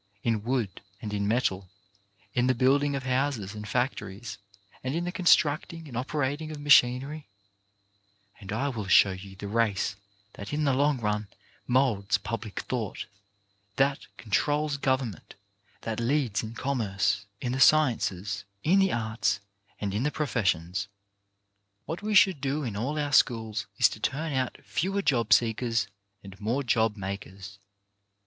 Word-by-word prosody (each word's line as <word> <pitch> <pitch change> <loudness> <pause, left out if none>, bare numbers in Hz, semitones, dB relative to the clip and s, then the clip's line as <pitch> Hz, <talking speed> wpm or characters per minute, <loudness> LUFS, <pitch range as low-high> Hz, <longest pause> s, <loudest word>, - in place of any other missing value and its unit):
in 115 -3 +1
wood 115 -6 -2 0.2
and 105 -1 -5
in 100 0 -1
metal, 100 -5 0 0.6
in 125 0 +2
the 130 - +3
building 140 +3 +3
of 135 - -3
houses 130 -6 -1
and 105 0 -7
factories, 105 -4 -3 0.4
and 130 +3 -2
in 170 - -1
the 175 - -2
constructing 165 -2 +2
and 125 - -9
operating 145 +4 -2
of 155 -2 -7
machinery, 145 +1 +4 1.1
and 100 -3 -8
I 115 +7 0
will 110 -7 -4
show 95 +1 +6
you 95 +1 -9
the 100 +1 -7
race 105 -2 0 0.4
that 100 - -8
in 150 +1 0
the 140 -2 +3
long 145 +1 +2
run 105 -1 -1 0.4
moulds 115 -5 +2
public 115 -3 -5
thought, 115 -6 -4 0.7
that 140 +1 +1
controls 145 +6 0
government, 130 - -2 0.5
that 110 0 -3
leads 120 -3 +1
in 110 +1 -7
commerce, 105 -6 -1
in 125 - -2
the 130 - -2
sciences, 105 -10 +3 0.2
in 185 +5 +4
the 195 -1 +3
arts 110 -3 0 0.4
and 100 -2 -2
in 105 - 0
the 145 - +1
professions. 100 - -1 1.0
What 165 - -5
we 210 0 -1
should 190 -7 +5
do 140 +2 -1
in 115 -6 -4
all 130 +9 -2
our 145 -1 -1
schools 110 -4 +2
is - - +6
to - - -8
turn 150 +6 -2
out 130 -1 -1
fewer 195 +3 -1
job 120 - +1
seekers 115 -1 +3 0.4
and 100 0 -12
more 120 +7 0
job 110 -3 +1
makers. 100 0 -7
120 Hz, 150 wpm, -28 LUFS, 105-140 Hz, 1.1 s, show